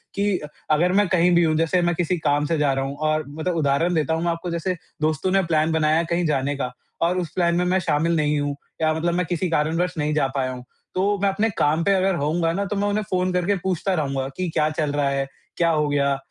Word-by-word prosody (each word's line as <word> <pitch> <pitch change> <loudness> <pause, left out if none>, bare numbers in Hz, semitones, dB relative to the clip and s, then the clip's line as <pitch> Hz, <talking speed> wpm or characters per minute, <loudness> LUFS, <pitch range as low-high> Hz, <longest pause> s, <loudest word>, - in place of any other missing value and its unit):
कि 200 -2 +1
अ, 150 - -7 0.2
अगर 175 +4 +3
मैं 205 -1 +3
कहीं 180 -1 +3
भी 170 - +5
हूँ 155 -1 +2
जैसे 165 +2 +2
मैं 175 0 +1
किसी 175 +1 0
काम 145 -2 +1
से 165 +1 0
जा 145 -2 +2
रहा 135 0 -1
हूँ 140 +1 -5
और 155 0 +1
मतलब 160 +4 -3
उदाहरण 160 +3 +1
देता 160 -1 +1
हूँ 165 +1 -1
मैं 170 - +1
आपको 165 +1 -4
जैसे 170 +2 -1 0.3
दोस्तों 155 +4 0
ने 195 -1 +3
प्लान 160 -1 +1
बनाया 160 +1 +2
कहीं 170 0 +1
जाने 140 -1 0
का। 125 -2 -3 0.3
और 175 +2 +2
उस 170 - -3
प्लान 170 -1 +1
में 180 - +2
मैं 185 +1 +2
शामिल 165 0 +1
नहीं 150 -1 +1
हूँ 145 0 -2 0.3
या 155 0 +3
मतलब 170 +2 -1
मैं 180 -1 0
किसी 175 +1 -2
कारणवश 165 +3 0
नहीं 150 0 0
जा 145 -3 +2
पाया 130 -1 0
हूँ। 125 -1 -8 0.3
तो 200 +2 +1
मैं 200 - +3
अपने 215 +3 0
काम 155 +3 +2
पे 200 - +3
अगर 190 -1 +2
होऊँगा 165 +2 0
ना 200 +2 -1
तो 205 - -3
मैं 205 +1 0
उन्हें 210 +1 0
फ़ोन 185 0 0
करके 180 +3 +1
पूछता 190 +1 0
रहूँगा 135 -4 -1
कि 185 -2 -1
क्या 155 0 +2
चल 155 -2 -1
रहा 145 -1 +1
है? 135 0 -1 0.3
क्या 170 -1 +3
हो 150 -2 +1
गया 140 -1 +1
165 Hz, 260 wpm, -23 LUFS, 150-180 Hz, 0.3 s, भी